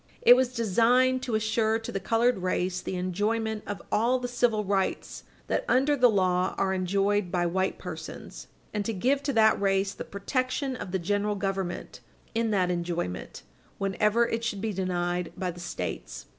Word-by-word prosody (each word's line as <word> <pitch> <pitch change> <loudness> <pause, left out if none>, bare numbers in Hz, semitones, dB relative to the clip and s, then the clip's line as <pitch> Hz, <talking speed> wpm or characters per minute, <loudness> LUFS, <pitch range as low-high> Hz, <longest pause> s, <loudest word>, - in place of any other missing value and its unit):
It 245 - +9
was 255 -1 +1
designed 245 +4 +3
to 240 -3 -2
assure 220 +1 +1
to 225 - -6
the 195 - -2
colored 230 +4 +2
race 185 0 -1
the - - -4
enjoyment 210 +4 -1
of 205 -4 -5
all 240 +4 +3
the 250 -1 -3
civil 240 -3 +1
rights 195 -1 -2 0.2
that, - - -1
under 275 +3 +3
the 250 -3 +5
law, 185 -3 +1
are 190 -1 +1
enjoyed 195 +1 +1
by 175 -1 +1
white 190 +2 0
persons, 160 -3 -8 0.3
and 210 -1 -1
to 225 - -2
give 260 +8 +1
to 280 - -2
that 220 -2 +4
race 195 0 +1
the - - -6
protection 255 +6 -2
of 190 - -6
the 190 - +1
general 205 +3 0
government 195 -2 -3 0.3
in 225 0 0
that 185 -4 +2
enjoyment 170 - -4 0.3
whenever 210 +4 +2
it 230 0 -2
should 210 -3 -2
be 215 +1 -2
denied 180 -2 -2
by 185 -2 -2
the 175 - -12
States. - - -5
205 Hz, 175 wpm, -27 LUFS, 185-230 Hz, 0.3 s, It